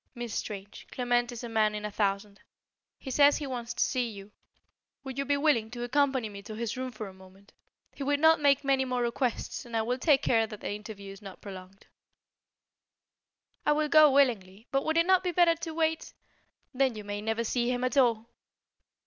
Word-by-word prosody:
Miss 240 -3 -5
Strange, 200 -1 -6
Clement 245 -1 0
is 240 0 -8
a - - -4
man 215 -2 +1
in 210 0 -5
a 210 - -4
thousand. 200 0 -2 0.6
He 265 - -8
says 285 +2 +5
he 295 - -5
wants 245 -3 -5
to - - +2
see 250 -3 -1
you. 200 -1 -11 0.7
Would 265 -1 -6
you 275 - -1
be 285 +1 +1
willing 280 -7 +2
to 240 +1 -6
accompany 265 -1 +1
me 200 -1 -9
to 215 +2 -9
his 230 +1 -3
room 255 0 -4
for 225 -3 -7
a 190 - -11
moment? 190 +1 -18 0.4
He - - -12
will 285 +1 +1
not 320 +1 +5
make 280 -1 +3
many 270 -1 +2
more 250 -1 -1
requests 240 +1 -2
and 235 -2 -4
I 220 - +1
will 250 +3 -2
take 285 -2 +3
care 225 -2 +2
that 210 -1 -9
the - - -4
interview 205 -1 -8
is 195 +1 -12
not 195 -2 -10
prolonged." 190 -1 -11 1.8
"I 295 - +3
will 300 0 0
go 310 0 +7
willingly. 225 -7 +1
But 275 0 0
would 315 +1 0
it 335 - +4
not 375 0 +4
be 365 - 0
better 345 -1 +4
to 330 0 -6
wait 320 -1 -1 0.3
" - - -46
"Then 260 -2 +1
you 210 - -7
may 205 0 -5
never 225 +2 -1
see 240 +1 0
him 250 0 -2
at 255 +3 -1
all." 235 -4 +3
240 Hz, 215 wpm, -29 LUFS, 210-275 Hz, 1.8 s, go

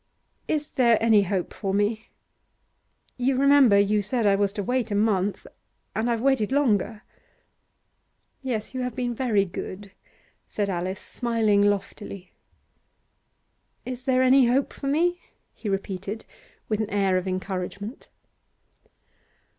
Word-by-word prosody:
'Is 300 -1 -1
there 235 -4 +3
any 225 -2 +5
hope 190 -2 -2
for 195 -2 -2
me? 215 +2 0 1.1
You 255 +1 +1
remember 275 -6 +6
you 205 +1 +3
said 225 +3 -1
I 200 - +5
was 200 0 +1
to 205 - -3
wait 245 +1 -1
a 205 - -1
month, 205 -2 +1 0.5
and 225 +2 0
I've 230 -1 0
waited 265 -5 +2
longer.' 225 -6 +1 1.4
'Yes, 240 -5 -3
you 260 - -3
have 250 -2 -3
been 245 -1 -2
very 225 -5 +1
good,' 195 +2 -7 0.6
said 200 -2 -2
Alice, 185 +2 -3
smiling 225 -4 +1
loftily. 200 -2 -2 1.5
'Is 255 0 -6
there 260 -1 +3
any 260 -1 +5
hope 265 +3 +1
for 275 - -6
me?' 345 +5 +1 0.3
he 215 - -6
repeated, 195 +2 -4 0.4
with 215 -1 -1
an 215 -1 -2
air 195 -2 +1
of 185 +1 -1
encouragement. 190 +4 -5
215 Hz, 130 wpm, -25 LUFS, 200-250 Hz, 1.5 s, remember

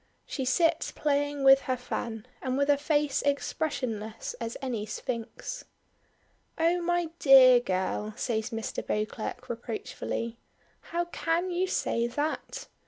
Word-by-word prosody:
She 265 - -3
sits 330 +5 +2
playing 290 -1 0
with 270 0 +8
her 255 - +2
fan, 230 -3 -4 0.2
and 260 0 -1
with 280 +1 +3
a 285 - +4
face 295 -2 +1
expressionless 255 -6 -2
as 230 0 -4
any 235 -5 -3
sphinx. 235 - -5 0.9
"Oh! 335 +2 +2
my 350 -1 0
dear 260 -3 +8
girl!" 210 0 -2
says 225 -1 -1
Mr. 225 0 -4
Beauclerk 215 +4 -3
reproachfully, 230 0 -4 0.5
"how 345 +1 0
can 345 +1 -1
you 360 +2 +1
say 235 -9 0
that! 290 +6 -3
260 Hz, 125 wpm, -29 LUFS, 230-305 Hz, 0.9 s, with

